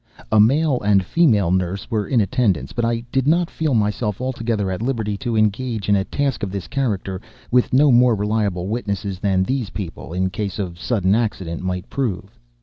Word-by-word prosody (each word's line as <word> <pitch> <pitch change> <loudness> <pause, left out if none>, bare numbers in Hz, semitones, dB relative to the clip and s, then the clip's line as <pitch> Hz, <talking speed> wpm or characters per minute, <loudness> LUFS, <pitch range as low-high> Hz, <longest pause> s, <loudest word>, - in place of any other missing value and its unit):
A 110 - +5
male 135 +5 +3
and 100 -1 +3
a - - -7
female 105 - +3
nurse 95 +1 -1
were 105 -3 0
in 120 -4 +3
attendance; 100 - 0
but 120 - -2
I 115 0 0
did 135 0 +1
not 170 +2 +2
feel 155 -5 0
myself 105 -1 0
altogether 115 -6 -2
at 95 - -4
liberty 115 -4 -1
to 115 0 -2
engage 110 0 0
in 100 - +5
a 95 - +1
task 140 +4 -2
of 100 - -2
this 100 -2 -5
character 100 -8 -2 0.3
with 125 0 +3
no 140 +2 +5
more 120 -1 +5
reliable 105 -3 -1
witnesses 100 -4 -3
than 95 -2 +1
these 125 -1 -2
people, 90 -4 -7
in 95 +1 -1
case 100 +1 -4
of 90 -4 -4
sudden 100 -2 +1
accident, 100 -7 -1
might 90 -1 -3
prove. 120 -10 -3
105 Hz, 195 wpm, -21 LUFS, 95-125 Hz, 0.3 s, A